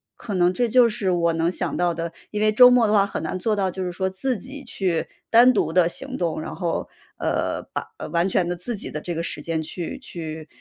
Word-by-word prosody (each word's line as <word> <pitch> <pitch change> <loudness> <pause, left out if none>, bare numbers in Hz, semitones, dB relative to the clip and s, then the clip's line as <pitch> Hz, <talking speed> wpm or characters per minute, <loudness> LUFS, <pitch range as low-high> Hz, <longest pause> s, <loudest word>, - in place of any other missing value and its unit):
可 205 -4 -5
能 180 0 +3
这 240 +4 +1
就 245 +1 +6
是 210 -3 -2
我 170 -1 +2
能 165 +1 +1
想 - - -2
到 175 0 +1
的。 165 0 -4 0.2
因 210 - -3
为 215 0 +3
周 250 +4 +8
末 245 -2 +5
的 210 - +1
话 200 - +5
很 - - -5
难 - - -3
做 215 +3 +1
到， 190 -2 0
就 190 +1 -4
是 180 - -2
说 190 +2 -1
自 225 +6 -2
己 275 +5 -9
去 180 -9 -1 0.2
单 240 +2 +7
独 165 -9 0
地 180 -2 +4
行 265 +8 -5
动， 165 -3 -1
然 - - -6
后， 175 -3 -2 0.3
呃， - - -1
把 - - -2 0.3
完 170 +3 +2
全 180 -1 +1
的 175 - -1
自 225 +7 -4
己 200 - -5
的 150 - -5
这 175 +1 -4
个 165 - -2
时 150 - -4
间 160 +1 -2
去 170 - -5
去， 160 - -7
185 Hz, 265 characters per minute, -23 LUFS, 170-215 Hz, 0.3 s, 周